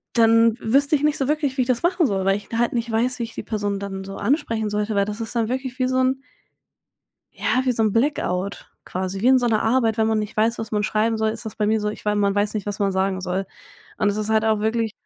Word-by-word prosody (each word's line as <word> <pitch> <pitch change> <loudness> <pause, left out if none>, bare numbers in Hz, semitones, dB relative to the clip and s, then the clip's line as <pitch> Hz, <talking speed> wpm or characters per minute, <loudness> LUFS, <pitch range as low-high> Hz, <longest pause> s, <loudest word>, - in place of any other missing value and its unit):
Dann 230 0 +5
wüsste 280 +6 +3
ich 290 - -3
nicht 300 0 +3
so 270 - 0
wirklich, 295 -3 0
wie - - 0
ich 245 - -4
das 255 +4 0
machen 350 0 +2
soll, 195 -4 -1
weil 195 0 +3
ich 205 - -10
da 230 - -3
halt 240 0 +1
nicht 235 -1 -2
weiß, 245 +3 0
wie - - 0
ich 225 -1 -6
die - - -6
Person 205 -2 -2
dann 195 -1 -5
so 195 0 -8
ansprechen 225 -2 0
sollte, 210 +1 -2
weil 200 - +3
das 210 +2 -6
ist 225 +2 -5
dann 225 -2 +1
wirklich 260 0 -4
wie 255 - +1
so 255 0 -1
'n 260 0 +3 1.2
ja, 255 - 0
wie 255 - +2
so 225 - 0
'n 215 -2 +2
Blackout 200 -7 -1 0.2
quasi, 185 +1 -4
wie 240 - +3
in 260 0 +6
so 245 - 0
'ner 220 -2 +2
Arbeit. 225 -1 +1
Wenn 220 - +3
man 220 -1 +1
nicht 210 -1 -4
weiß, 225 +2 +2
was 225 - -6
man 210 -1 +1
schreiben 215 +2 +1
soll, 220 0 +1
ist 225 - -5
das 220 - -7
bei 210 - 0
mir 220 +1 +2
so. 210 - -1
Ich 210 - -7
wei 210 0 +1
man 200 -1 +1
weiß 205 +1 0
nicht, 210 -2 -3
was 205 -1 -3
man 200 -1 +1
sagen 190 0 0
soll. 185 +1 -2 0.5
Und 210 - +2
es 205 - -1
ist 215 0 -2
halt 220 0 +3
auch 220 -1 +2
wirklich 220 0 0
220 Hz, 285 wpm, -22 LUFS, 205-240 Hz, 1.2 s, in